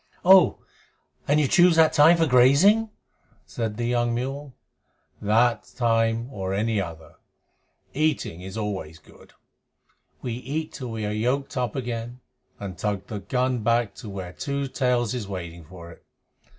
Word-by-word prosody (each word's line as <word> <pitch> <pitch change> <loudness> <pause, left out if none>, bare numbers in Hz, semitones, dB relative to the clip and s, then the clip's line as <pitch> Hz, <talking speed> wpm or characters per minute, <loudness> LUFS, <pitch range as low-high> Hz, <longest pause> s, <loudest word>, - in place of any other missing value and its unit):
"Oh! 190 -1 +6 0.7
And 145 +2 +3
you 150 - +2
choose 175 +3 +5
that 160 -1 +5
time 160 +2 +6
for 165 - +3
grazing?" 150 - +5 0.6
said 105 +8 -4
the 120 - -2
young 120 0 0
mule. 135 +2 -5 0.7
"That 110 +1 +1
time 115 -1 +1
or 95 -2 -3
any 110 0 0
other. 80 -3 -9 0.8
Eating 150 - -1
is 95 +3 -8
always 95 -7 -4
good. - - -20 0.9
We 120 - -3
eat 140 +6 -5
till 125 -3 -6
we 110 -2 -4
are 105 - -2
yoked 125 +6 -1
up 125 -4 -2
again 120 -1 -5 0.4
and 95 -3 -7
tug 100 -2 -2
the 105 -1 -6
gun 125 +5 -1
back 115 -1 +1
to 115 - -9
where 95 -2 -7
Two 140 +4 -3
Tails 125 -3 0
is 120 -6 -4
waiting 85 -4 -7
for 85 0 -12
it. - - -17
120 Hz, 150 wpm, -24 LUFS, 100-135 Hz, 0.9 s, Oh